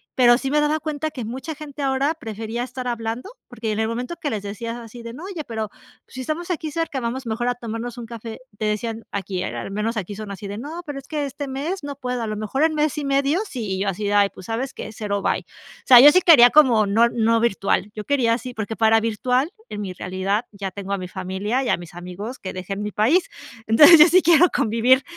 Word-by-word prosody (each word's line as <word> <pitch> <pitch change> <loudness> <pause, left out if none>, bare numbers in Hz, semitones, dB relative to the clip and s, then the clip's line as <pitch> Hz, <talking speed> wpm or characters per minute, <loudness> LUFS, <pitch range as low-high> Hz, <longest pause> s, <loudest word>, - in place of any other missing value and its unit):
Pero, 240 -1 +6
sí 270 +1 -3
me 300 - +3
daba 300 +1 +1
cuenta 310 0 -3
que 255 -5 -6
mucha 265 +8 -6
gente 295 -1 -9
ahora 275 +2 +1
prefería 225 -2 -5
estar 250 0 -6
hablando, 235 - -3 0.2
porque 230 -3 -4
en 210 - -2
el 220 - +1
momento 245 +8 -4
que 295 - -1
les 215 -6 -3
decías 220 +3 -5
así 235 0 -10
de: 230 0 -7
"No, 300 - -9
oye, 370 -5 -5
pero, 220 -2 -4 0.4
si 260 - -10
estamos 320 +7 -3
aquí 315 -2 -3
cerca, 330 -4 -2
vamos 250 +2 -4
mejor 230 +2 -2
a 245 - +1
tomarnos 235 0 -6
un 240 - -6
café", 230 -1 -8 0.2
te 215 - -2
decían 220 +1 -2
aquí, 195 -2 -3
eh, - - -4
al - - -5
menos 210 +3 -2
aquí 205 0 -4
son 215 0 -7
así 200 +1 -7
de: 200 +1 -6
"No, 315 +7 -6
pero, 290 -3 -5
es 275 - -15
que 300 -2 -2
este 280 +1 -6
mes 290 +7 -4
no 285 -1 -5
puedo, 250 -2 -3
a - - -3
lo 215 - -3
mejor 215 +7 -1
en 320 -1 +2
mes 300 0 0
y 290 - -4
medio 275 +4 +2
si, 215 -7 -3
y - - -5
yo 205 - -1
así 195 +2 -4
de: 205 - 0
"Ay, 205 -1 +4
pues, 185 - -12
¿sabes 245 +4 -3
qué?, 220 - -7
cero, 205 -2 -3
bye". - - +1
O - - -20
sea, 250 -2 +10
yo 290 +3 +10
sí 365 - +4
quería 275 -9 +8
como 250 -8 +5
no 225 +4 +4
no 230 0 +2
virtual, 200 -2 0
yo 210 - -5
quería 240 -5 +2
sí, 250 +1 -8
porque 220 -1 -4
para 225 0 +4
virtual 250 - 0 0.2
en 210 - -6
mi 190 -2 -5
realidad 190 +5 -2
ya 200 -2 -5
tengo 200 0 -7
a - - 0
mi 180 - -6
familia 190 +7 -2
y 255 - -2
a - - +2
mis 175 -1 -11
amigos 180 +8 -7
que 185 - -6
dejen 195 +2 -5
mi 210 - -3
país. 280 - +2 0.4
Entonces, 295 +10 +9
yo 305 - +10
sí 370 +2 +6
quiero 340 +1 +6
convivir 240 +4 +3
235 Hz, 255 wpm, -22 LUFS, 210-275 Hz, 0.4 s, sea